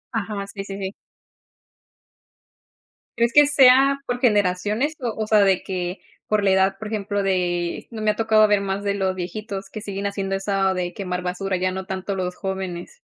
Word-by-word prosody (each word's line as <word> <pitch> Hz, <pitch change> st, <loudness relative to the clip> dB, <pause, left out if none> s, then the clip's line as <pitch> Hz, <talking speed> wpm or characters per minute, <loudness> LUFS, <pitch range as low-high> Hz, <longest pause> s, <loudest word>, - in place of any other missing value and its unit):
Ajá, 205 Hz, -2 st, -3 dB
sí, 200 Hz, 0 st, -7 dB
sí, 195 Hz, 0 st, -7 dB
sí. 195 Hz, 0 st, -4 dB, 2.2 s
¿Crees 235 Hz, 0 st, +2 dB
que 295 Hz, 0 st, +8 dB
sea 275 Hz, 0 st, +6 dB
por 245 Hz, 0 st, -2 dB
generaciones?, 210 Hz, +5 st, +1 dB
o 235 Hz, -4 st, -2 dB
o 215 Hz, -1 st, -2 dB
sea, 215 Hz, -1 st, +5 dB
de 195 Hz, -2 st, +3 dB
que 180 Hz, -1 st, -4 dB, 0.3 s
por 210 Hz, -1 st, +1 dB
la 195 Hz, -, +3 dB
edad, 190 Hz, +1 st, +3 dB
por 220 Hz, -, -6 dB
ejemplo, 205 Hz, -1 st, -2 dB
de 175 Hz, -3 st, -1 dB
no 220 Hz, -2 st, -6 dB
me 215 Hz, -, +1 dB
ha 210 Hz, -, +2 dB
tocado 220 Hz, -1 st, +4 dB
ver 205 Hz, -1 st, +3 dB
más 195 Hz, +1 st, -3 dB
de 200 Hz, 0 st, 0 dB
los 190 Hz, -1 st, 0 dB
viejitos 195 Hz, +2 st, -5 dB
que 215 Hz, -, -7 dB
siguen 200 Hz, -1 st, -3 dB
haciendo 195 Hz, -1 st, -3 dB
eso 195 Hz, -1 st, 0 dB
de 180 Hz, -1 st, -3 dB
quemar 180 Hz, -2 st, -3 dB
basura, 185 Hz, +2 st, -2 dB
ya 185 Hz, +1 st, 0 dB
no 190 Hz, 0 st, -5 dB
tanto 190 Hz, +1 st, -4 dB
los 180 Hz, -1 st, -2 dB
jóvenes. 190 Hz, -, -5 dB
195 Hz, 190 wpm, -23 LUFS, 190-215 Hz, 2.2 s, que